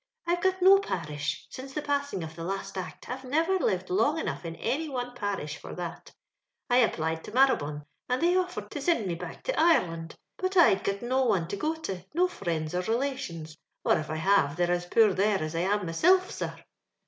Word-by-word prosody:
I've 345 +1 0
got 375 -1 +1
no 390 +1 +8
parish; 160 - -3
since 270 +1 -8
the 300 - -2
passing 285 - -1
of 160 0 -8
the 165 - -6
last 195 +3 -4
Act, 185 -1 -6
I'vo 260 +1 -6
niver 330 +8 +2
lived 185 - -1
long 230 - +2
enough 320 - -3
in 165 0 -5
any 285 - -2
one 250 -2 -4
parish 200 -10 -3
for - - -9
that 175 -2 -6 0.6
I 245 - +5
applied 160 -9 +1
to - - -8
Marabone, 215 - +2 0.3
and 250 +1 +1
Uiey 360 +2 +4
offered 360 0 -8
to - - -5
sind 335 - +1
me 180 - -1
back 170 - -8
to - - -1
Ireland, 170 - +2 0.2
but 370 +1 -1
I'd 195 - +6
got 200 +3 -2
no 260 +2 +1
one 185 -8 +1
to - - -2
go 310 +10 -1
to, 190 - -5
no 360 +2 +4
friends 165 - -3
or 180 - +1
relations, 225 - -3 0.3
or - - +4
if 155 - -6
I 155 - -2
have, 160 -3 +3
they're 175 0 +1
as 175 0 -1
poor 215 +1 +5
there 200 +2 +2
as 155 -1 -4
I - - 0
am 200 +4 +1
mysilf^ 365 - +3
sir. - - -4
210 Hz, 210 wpm, -28 LUFS, -, 0.6 s, no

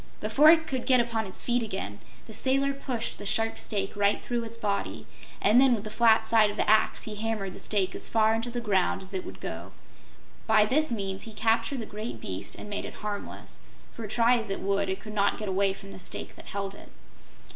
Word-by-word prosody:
Before 270 +9 +5
it 320 -1 +6
could 260 -5 -3
get 255 -2 +5
upon 230 -3 0
its 185 - -3
feet 245 0 +1
again 190 - -4 0.3
the 220 - -11
sailor 275 +4 +1
pushed 255 -4 -4
the - - -7
sharp 225 +2 +1
stake 200 -2 -2
right 200 0 +2
through 240 -1 -3
its 230 0 -5
body 205 -3 -2 0.3
and 220 +5 +5
then 265 -2 +5
with 210 - -6
the 215 - -6
flat 225 0 +4
side 220 -2 +4
of 205 - -6
the - - 0
axe 215 0 +3
he 215 - -6
hammered 210 -3 -3
the - - -10
stake 195 -3 0
as - - -1
far 220 -1 +3
into 225 +2 -2
the 240 0 -4
ground 195 -3 +1
as 190 - -9
it 185 - -2
would - - -9
go. - - -6 0.7
By 215 -1 +5
this 305 +7 +1
means 195 -4 -3
he - - -11
captured 230 +4 +1
the - - -5
great 210 - -6
beast 95 -1 -5
and - - -9
made 205 0 -4
it - - -8
harmless, 205 -1 -6 0.3
for 225 -2 -7
try 235 +3 +4
as 220 -2 -6
it 195 - -3
would, 200 0 0
it 190 - -2
could 215 +1 -9
not 200 -1 +2
get 215 - -5
away 195 +1 +2
from 195 +1 -10
the - - -10
stake 180 - -7
that - - -13
held 195 -1 -4
it. - - -13
215 Hz, 230 wpm, -28 LUFS, 200-235 Hz, 0.7 s, it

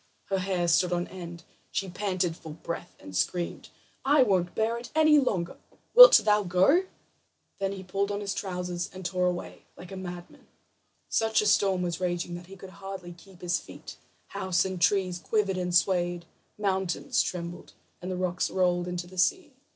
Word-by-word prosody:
Her 195 -1 +1
hair 185 -2 -1
stood 170 +2 +3
on 175 0 0
end; 175 -2 -9 0.3
she 195 - -2
panted 185 -2 -2
for 165 - -11
breath, 170 +2 -7
and 95 - -10
screamed: 175 - -2 0.3
"I 280 0 +5
won't 185 -6 0
bear 225 +2 0
it 240 - -10
any 310 -1 +6
longer; 185 -10 -1 0.4
wilt - - +11
thou 210 0 +4
go?" 195 - +3 0.7
Then 195 0 -1
he 190 -1 -8
pulled 195 +2 -1
on 205 - -2
his 200 -1 -3
trousers 180 -2 -4
and 185 -1 -10
tore 180 0 +1
away 180 -1 -5
like 180 - -11
a - - -6
madman. 180 -2 -9 0.6
Such 220 0 +1
a - - +1
storm 195 -3 +3
was 175 -1 -2
raging 175 -1 -2
that 175 0 -8
he 195 - -11
could 190 0 -11
hardly 190 -2 -7
keep 180 +1 -18
his 175 -1 0
feet; - - -11 0.3
houses 190 -2 0
and 185 -2 -4
trees 185 -1 +2
quivered 200 -1 0
and 180 -1 -1
swayed, 175 -1 +1 0.3
mountains 190 -3 0
trembled, 175 -1 -5 0.3
and 180 - -5
the 185 - -3
rocks 180 -1 -1
rolled 180 -1 +1
into 180 0 -4
the 185 +1 -9
sea. 310 - +1
185 Hz, 180 wpm, -28 LUFS, 175-195 Hz, 0.7 s, wilt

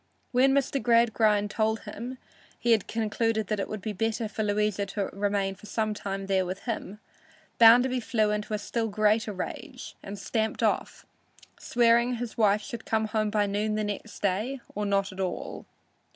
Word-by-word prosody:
When 260 +2 +4
Mr. 275 0 +1
Gradgrind 220 -3 +3
told 220 0 0
him 235 +4 -7 0.4
he 240 - +1
had 220 -4 +3
concluded 220 -1 -1
it 205 -2 -1
would 215 -3 -5
be 215 - -3
better 225 +2 -1
for 215 - -4
Louisa 205 -1 0
to 195 0 -3
remain 200 -1 0
for 195 +2 -14
some 215 -1 -1
time 195 -1 -4
there 190 -1 +2
with 185 +2 -5
him, 210 -3 -4 0.6
Bounderby 245 +3 +7
flew 220 -3 +1
into 210 0 -2
a - - 0
still 225 +2 -2
greater 215 +1 +2
rage 185 -2 -6
and 200 +1 -7
stamped 220 +3 -2
off, - - 0 0.5
swearing 235 +1 +3
his 235 -1 -5
wife 210 -2 +3
should 235 -3 -7
come 220 -1 0
home 215 -1 0
by 205 0 +2
noon 210 +2 -1
next 210 0 -4
day 215 +8 0
or 210 0 -2
not 200 0 +1
at 190 - -11
all. 185 -2 -4
215 Hz, 170 wpm, -28 LUFS, 205-230 Hz, 0.6 s, Bounderby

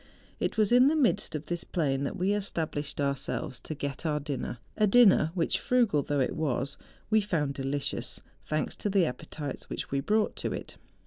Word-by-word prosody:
It - - -1
was 215 -1 +3
in 250 +2 +7
the 305 - +3
midst 240 - +2
of 155 0 -4
this 175 -1 -3
plain 140 -5 0
that - - -3
we 190 +3 +2
established 160 -8 -3
ourselves 140 0 -2
to 155 - -6
get 140 0 -4
our 150 -2 0
dinner,— 140 -4 -4 0.2
a 215 - +3
dinner 200 -7 +6
which, 170 -3 +1
frugal 235 -12 +3
though 145 +1 -1
it 130 - 0
was, 140 -4 -1 0.4
we 220 0 +5
found 155 -8 0
delicious, 135 +1 -3 0.2
thanks 155 0 -2
to 210 - -1
the 195 -3 +4
appetites 145 +1 -6
which - - -5
we 140 - +1
brought 210 +9 +1
to - - -2
it. - - -7
155 Hz, 190 wpm, -29 LUFS, 140-205 Hz, 0.4 s, in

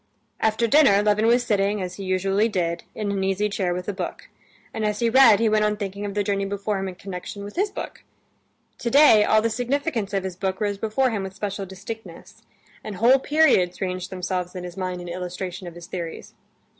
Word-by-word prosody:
After 220 +1 +1
dinner 225 -5 +5
Levin 210 +1 +2
was 240 +1 +4
sitting, 205 -2 +1
as 180 -1 -5
he 200 - -6
usually 195 +3 +1
did, 170 -4 -2
in 210 -2 -2
an 195 -1 -1
easy 195 +2 0
chair 190 -3 -1
with 180 +1 -4
a 205 - -1
book, 185 -2 -6 0.4
and 220 - -3
as 210 -1 0
he 230 +1 +1
read 235 -5 +7
he 230 - +2
went 215 0 +3
on 210 0 +1
thinking 200 0 -5
of 200 -1 -5
the 205 - +1
journey 200 0 -1
before 200 +1 -2
him 195 - -3
in 185 - -6
connection 195 +2 -7
with 205 - -9
his 400 +3 +1
book. 400 - -8 0.8
Today 235 -3 +6
all 215 +1 +3
the 230 - +2
significance 245 -2 -1
of 195 -2 -1
his 190 -2 -5
book 190 0 -2
rose 205 -2 -1
before 230 +4 +1
him 210 -3 -2
with 190 0 -6
special 200 -1 -4
distinctness, 205 +4 -10 0.4
and 215 - -6
whole 245 +7 +5
periods 265 - +3
ranged 185 -1 -3
themselves 180 -1 -3
in 180 - -5
his 175 -1 -8
mind 185 -2 -4
in 175 - -8
illustration 180 +1 -5
of 170 - -9
his 175 0 -10
theories. 170 -3 -7
200 Hz, 215 wpm, -24 LUFS, 185-220 Hz, 0.8 s, read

